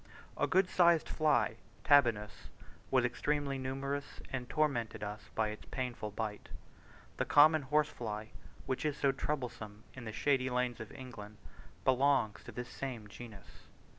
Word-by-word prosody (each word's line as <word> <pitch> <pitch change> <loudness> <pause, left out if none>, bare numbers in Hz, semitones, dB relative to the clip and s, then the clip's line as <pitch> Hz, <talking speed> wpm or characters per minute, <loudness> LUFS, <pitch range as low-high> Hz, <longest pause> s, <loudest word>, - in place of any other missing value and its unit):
A - - +1
good 185 0 +4
sized 170 -3 +4
fly 120 -8 +2 0.3
(Tabanus) 120 -8 +3 0.4
was 130 -2 +3
extremely 140 +2 -1
numerous, 140 +2 -3
and 125 -2 -4
tormented 120 -9 0
us 105 +1 -6
by 110 -1 +1
its 105 - -8
painful 125 -4 -3
bite. 105 0 -5 0.7
The - - 0
common 155 +1 +6
horsefly, 120 -7 -1 0.4
which 130 - -2
is 150 -1 0
so 140 - +3
troublesome 120 -7 -4
in 125 -2 -9
the 110 - -4
shady 130 +3 +1
lanes 125 -1 0
of 110 - -7
England, 105 -5 -9 0.5
belongs 130 -4 +3
to - - -8
this 125 0 -6
same 120 -6 -5
genus. 110 -3 -12
125 Hz, 140 wpm, -34 LUFS, 110-140 Hz, 0.7 s, common